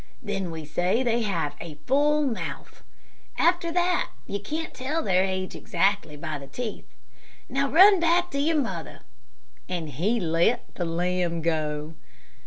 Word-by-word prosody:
Then 200 -6 -3
we 160 -2 -6
say 180 - +1
they 235 -1 +1
have 170 -9 -1
'a 165 -3 -7
full 295 +3 +3
mouth.' 245 -5 -5 0.6
After 340 -1 +2
that 355 +1 +1 0.2
you 200 - -3
can't 310 +10 -4
tell 290 +6 -2
their 185 -2 +3
age 185 -1 -2
exactly 195 -7 0
by 155 -1 -4
the 140 - -10
teeth. 220 - -6 0.6
Now, 275 +2 0
run 380 +5 +8
back 345 +1 +2
to 280 - -2
your 310 +2 +2
mother," 190 - -4 0.7
and 170 -4 -3
he 190 - 0
let 170 +6 +1
the 175 - -3
lamb 170 0 -1
go. 155 -1 -1
200 Hz, 150 wpm, -26 LUFS, -, 0.7 s, run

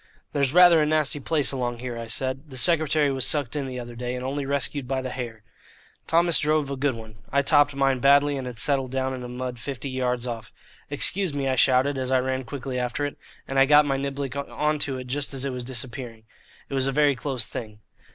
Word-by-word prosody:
"There's 140 -2 +1
rather 175 -1 +7
a - - +3
nasty 155 -1 +2
place 145 0 0
along 125 -3 -3
here," 125 0 -6
I 115 0 -6
said. 130 +5 -3
"The 130 - -8
secretary 155 -2 +4
was 135 -1 -1
sucked 145 -1 +2
in 140 -2 -2
the 130 -1 -5
other 120 0 -8
day, 125 +1 -4
and 125 0 -5
only 140 +1 -3
rescued 140 -1 -2
by 135 0 -1
the 130 - -4
hair." 115 -4 -6 0.6
Thomas 170 0 +4
drove 150 -1 +1
a - - -2
good 135 -1 0
one. 110 -1 -11
I 140 +1 +2
topped 145 0 +4
mine 135 -2 +1
badly, 140 +2 +4
and 130 -2 -4
it 125 -2 -7
settled 135 -1 0
down 130 0 -1
in 130 - -6
the 125 - -6
mud 125 0 -5
fifty 140 +1 -5
yards 125 -1 -1
off. 115 -2 -6 0.4
"Excuse 160 +3 +1
me," 140 -1 -1
I 130 - +1
shouted, 130 +2 +3
as 130 -1 -2
I 130 -1 +3
ran 130 0 -2
quickly 130 -1 -5
after 125 +4 -2
it, 145 - -5 0.3
and 135 0 0
I 135 - +5
got 150 +1 +6
my 135 -1 0
niblick 140 -1 -4
on 150 +2 -2
to 135 -2 -1
it, 130 - -7
just 140 +2 -2
as 135 0 -1
it 135 - -2
was 125 -1 -5
disappearing. 120 -2 -6 0.4
It - - -9
was 135 -1 +1
a - - 0
very 145 0 +3
close 130 -2 -1
thing. 110 -3 -7
135 Hz, 235 wpm, -25 LUFS, 125-145 Hz, 0.6 s, rather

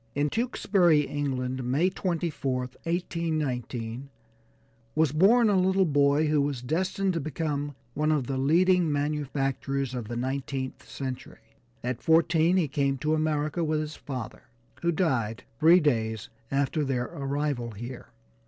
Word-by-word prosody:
In 145 +1 +1
Tewksbury, 195 -9 +3
England, 130 -3 -2
May 145 +10 +1
24th, 140 -9 -2
1819, 140 -8 -2 0.9
was 155 -3 +3
born 215 +10 +5
a 205 - +3
little 190 +1 +3
boy 145 0 +3
who 150 -1 +2
was 140 -3 -2
destined 185 +7 0
to 165 - -1
become 145 -1 -3 0.2
one 150 +3 +1
of 145 -5 +1
the 130 +1 -2
leading 170 +4 +3
manufacturers 140 -2 -1
of 120 -4 -4
the 120 - -5
nineteenth 130 +1 -4
century. 130 -2 -7 0.3
At 125 0 -3
fourteen 165 +2 +4
he 170 -5 +2
came 140 -1 0
to 155 +4 0
America 155 +1 0
with 155 -1 0
his 155 0 -4
father, 130 -6 -7 0.4
who 170 - +2
died 130 - 0 0.2
three 170 +3 +7
days 110 - 0 0.2
after 140 +3 0
their 130 -3 -1
arrival 140 -4 -2
here. 120 +4 -8
145 Hz, 135 wpm, -27 LUFS, 130-165 Hz, 0.9 s, three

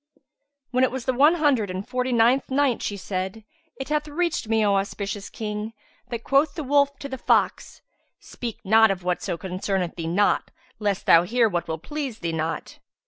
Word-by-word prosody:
When 255 0 +2
it 260 - +4
was 260 -2 -5
the 260 - +1
One 290 +7 +5
Hundred 280 - +2
and 185 +2 -5
Forty 255 0 -1
ninth 240 +3 +3
Night, 270 -2 +1
She 205 - -3
said, 190 +2 -4 0.3
It 270 - -7
hath 300 0 0
reached 335 -4 -1
me, 220 -1 +3
O 200 - +3
auspicious 200 0 -4
King, 210 0 -5 0.3
that 235 -2 -5
quoth 280 +2 +2
the 315 - -4
wolf 280 0 +2
to 280 - -7
the 265 -2 -6
fox, - - 0 0.4
"Speak 235 -3 -7
not 220 +2 +5
of 190 -2 -2
whatso 175 -1 -2
concerneth 185 0 -3
thee 165 -1 -4
not, 190 +5 +2 0.3
lest 205 -3 -1
thou 165 - +7
hear 230 +6 +2
what 175 -5 -2
will 160 - -3
please 270 - -5
thee 170 -6 -3
not!" 160 0 -4
225 Hz, 190 wpm, -24 LUFS, 190-265 Hz, 0.4 s, thou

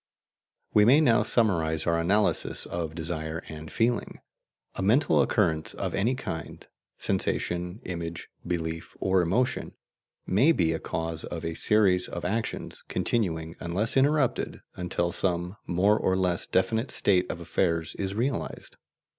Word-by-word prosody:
We 105 - +6
may 130 +7 +6
now 120 -7 +4
summarize 80 -9 +1
our 85 -1 +2
analysis 100 +5 +1
of 80 -2 -4
desire 80 -1 -4
and 80 0 -8
feeling. 120 +1 0 0.5
A - - -4
mental 100 - +4
occurrence 80 +3 +1
of - - -3
any 115 +7 +1
kind 80 - -6 0.3
sensation, 90 +5 -1
image, 85 -1 -5 0.2
belief, 80 -2 -4
or 95 -1 +3
emotion 105 +9 0 0.5
may 130 - +4
be 80 - +2
a 80 - -3
cause 80 -1 -4
of 85 -2 -5
a 80 - -2
series 95 -2 +3
of 85 - -6
actions, 110 +5 -3
continuing, 85 -7 -1
unless 95 +6 0
interrupted, 135 -2 +2
until 85 -1 -1
some 90 +2 -1
more 100 +4 +3
or 95 0 +1
less 90 -2 0
definite 110 +7 +1
state 90 -2 +2
of 85 - -4
affairs 85 -1 0
is 95 0 -2
realized. 125 +5 -3
90 Hz, 140 wpm, -27 LUFS, 85-105 Hz, 0.5 s, We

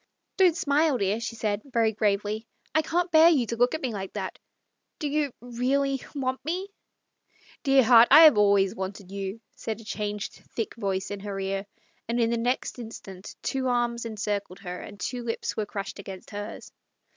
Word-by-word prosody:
" - - -53
Don't 360 -3 +5
smile, 290 -1 +2
dear," 200 +1 0
she 230 0 -4
said 215 -2 -1
very 230 -5 +1
gravely. 210 +1 0 0.3
"I 315 - +4
can't 345 +3 -1
bear 320 +1 +8
you 280 -8 +3
to 235 - -3
look 245 +5 +2
at 315 - -6
me 250 -3 -1
like 195 -2 -5
that. 190 -3 -5 0.6
Do 300 - -2
you 290 -1 0
— - - -52
really 260 +3 0
— - - -24
want 260 -2 -2
me? 360 +6 -3 0.3
" - - -50
" - - -28
Dear 270 -1 +6
heart, 235 0 +8
I 305 +4 +10
have 310 -6 +9
always 200 -2 +4
wanted 190 0 -6
you," 200 +2 -5
said 220 -1 -4
a - - -11
changed, 210 -1 -4
thick 225 - -2
voice 195 -4 -2
in 205 - -4
her 200 -1 -5
ear, 195 +1 -2 0.4
and 235 +1 0
in 230 0 +2
the 235 - +1
next 245 +2 -1
instant 200 -5 -9
two 265 -1 -1
arms 240 -1 0
encircled 205 -4 -3
her, 180 -1 -6
and 205 -1 -10
two 245 +6 -3
lips 230 -1 -3
were 215 -2 -2
crushed 200 0 -5
against 190 -1 -9
hers. 205 +2 -7
230 Hz, 205 wpm, -27 LUFS, 200-265 Hz, 0.6 s, I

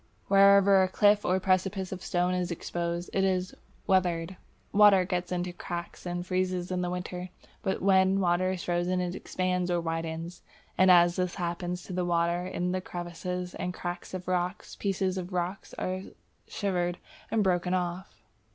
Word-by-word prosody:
Wherever 200 0 +6
a 185 - +3
cliff 205 +2 +4
or 185 +1 +2
precipice 190 0 0
of 190 -1 -5
stone 180 +1 0
is 180 -1 -1
exposed, 170 0 -3
it 195 - +2
is 185 -1 0 0.3
"weathered." 180 -2 +1 0.4
Water 200 -2 +6
gets 180 0 -2
into 180 0 -2
the - - -19
cracks 175 +1 -6
and 175 0 -3
freezes 185 -1 -1
in 180 0 0
winter. 180 0 -5 0.3
But 190 - -2
when 190 0 +4
water 180 0 +2
is 180 - -5
frozen 175 +1 0
it 180 -1 -2
expands 180 -1 -1
or 175 -1 +1
widens, 165 +1 -4 0.3
and 185 0 +5
as 175 -1 +6
this 180 -1 -1
happens 175 0 -3
to 185 - -8
the 180 0 0
water 175 +1 +1
in 180 -1 -2
the 185 0 -1
crevices 180 +1 -5
and 180 0 -4
cracks 175 +1 -5
of 180 -1 -7
rocks, 180 +1 -2
pieces 190 -1 -1
of 180 +1 -7
rock 180 +2 -2
are 185 0 -2 0.5
shivered 180 -3 -1 0.3
and 220 -2 +2
broken 180 -1 +1
off. 180 +1 -4
180 Hz, 170 wpm, -29 LUFS, 175-185 Hz, 0.5 s, Wherever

